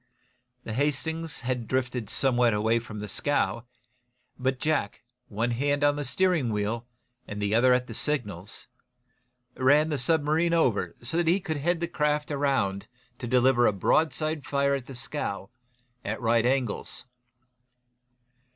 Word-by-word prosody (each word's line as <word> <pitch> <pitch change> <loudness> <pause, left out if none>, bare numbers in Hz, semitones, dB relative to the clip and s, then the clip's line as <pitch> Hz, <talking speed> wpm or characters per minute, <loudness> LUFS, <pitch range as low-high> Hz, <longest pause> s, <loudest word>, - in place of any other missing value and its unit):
The 110 - -5
"Hastings" 150 +4 -1
had 125 -2 -2
drifted 125 -4 -1
somewhat 120 -4 +2
away 110 +2 +2
from 115 -2 -9
the 105 0 -5
scow, 115 -1 0 0.7
but 130 0 0
Jack, 155 -9 -1 0.2
one 115 +3 -1
hand 145 +4 0
on 145 0 +2
steering 155 -2 +1
wheel 110 +3 -2 0.4
and 105 - -6
the 105 0 0
other 125 +3 +5
at 125 0 +3
the 115 - -8
signals, 105 - -3 0.9
ran 145 +4 +4
the 150 -3 -1
submarine 160 +4 +2
over 130 -10 +1
so 130 +7 -2
that 170 -1 +1
he 175 +4 +4
could 165 -5 -3
head 170 +4 0
the 170 - 0
craft 150 -2 0
around 135 -9 0 0.3
to 120 - -5
deliver 125 0 +4
a - - +4
broadside 155 - +1
fire 140 0 +1
at 135 -2 -3
the 135 - -8
scow, 125 -6 -3 0.5
at 110 +2 -3
right 115 0 +2
angles. 130 -1 -1
130 Hz, 145 wpm, -27 LUFS, 115-150 Hz, 0.9 s, other